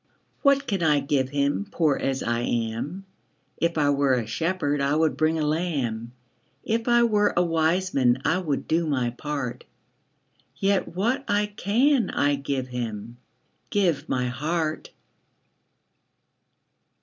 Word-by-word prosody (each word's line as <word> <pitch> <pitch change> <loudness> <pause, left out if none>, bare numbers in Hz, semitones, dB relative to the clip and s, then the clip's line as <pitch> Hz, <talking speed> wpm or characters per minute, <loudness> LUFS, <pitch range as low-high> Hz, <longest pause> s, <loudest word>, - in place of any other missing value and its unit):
What 280 -1 +3
can 195 -4 -2
I 150 -3 +3
give 140 -2 0
Him, 145 +7 0
Poor 155 -8 +2
as 135 -1 -2
I 115 0 0
am? 120 +11 -3 0.5
If 170 0 0
I 145 -1 +3
were 140 -2 +2
a 120 -3 -1
shepherd, 145 - -1
I 140 +1 +1
would 155 -3 +2
bring 155 +2 +1
a 155 - 0
lamb; 140 -8 -2 0.5
If 230 +1 -1
I 240 0 +5
were 210 -3 +2
a 175 - +5
wise 165 +3 +1
man, 125 -1 +3
I 180 - +2
would 150 -7 -2
do 165 +1 +1
my 130 -5 0
part: 140 -1 -4 0.9
Yet 195 +5 +1
what 235 +9 0
I 205 0 +2
can 245 +7 +2
I 145 0 +1
give 135 -2 -3
Him, 115 -2 -5 0.5
Give 180 -8 0
my 125 -1 0
heart. 155 +5 -2
150 Hz, 140 wpm, -25 LUFS, 130-185 Hz, 0.9 s, I